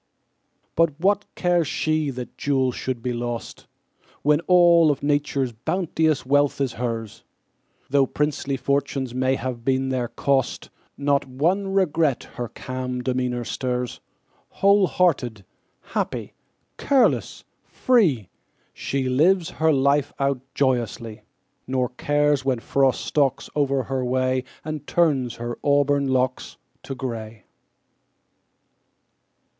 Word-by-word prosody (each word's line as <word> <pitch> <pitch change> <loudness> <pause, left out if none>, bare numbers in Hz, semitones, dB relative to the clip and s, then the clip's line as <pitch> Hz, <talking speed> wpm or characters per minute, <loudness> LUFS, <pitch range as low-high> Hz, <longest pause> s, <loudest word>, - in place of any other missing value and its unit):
But 160 -3 +2
what 200 +3 +2
cares 175 -3 +1
she 155 +1 0
that 125 -2 -7
jewels 130 -3 0
should 125 -2 -4
be 125 - -1
lost, 120 -1 -5 0.6
When 150 +1 +4
all 175 -3 +6
of 145 - -1
Nature's 145 -3 0
bounteous 160 - -1
wealth 145 +1 +2
is 135 -4 0
hers? 115 -3 -4 0.6
Though 135 0 +3
princely 145 -1 -1
fortunes 135 -1 -1
may 130 +1 +1
have 125 -2 -5
been 130 +1 +1
their 125 -2 -1
cost, 135 +1 -1 0.3
Not 140 -1 +1
one 170 +10 0
regret 160 -7 +2
her 120 - -4
calm 125 +1 -5
demeanor 125 -1 -1
stirs. 125 0 -3 0.5
Whole 200 -1 +4
hearted, 125 - 0 0.4
happy, - - -4 0.5
careless, 275 -3 +2 0.2
free, 170 - +2 0.5
She 135 -1 -2
lives 165 +7 +3
her 160 0 +2
life 140 0 +2
out 140 -2 0
joyously, 120 -4 -1 0.5
Nor 130 -1 0
cares 145 +2 +1
when 130 -2 +1
Frost 135 +3 +1
stalks 135 -3 0
o'er 140 -2 +1
her 135 -1 -2
way 130 0 0 0.2
And 155 -2 -5
turns 140 -8 +1
her 120 0 -5
auburn 145 -1 +2
locks 130 -1 -1 0.2
to 135 - -6
gray. 115 -4 -6
135 Hz, 120 wpm, -23 LUFS, 125-150 Hz, 0.6 s, all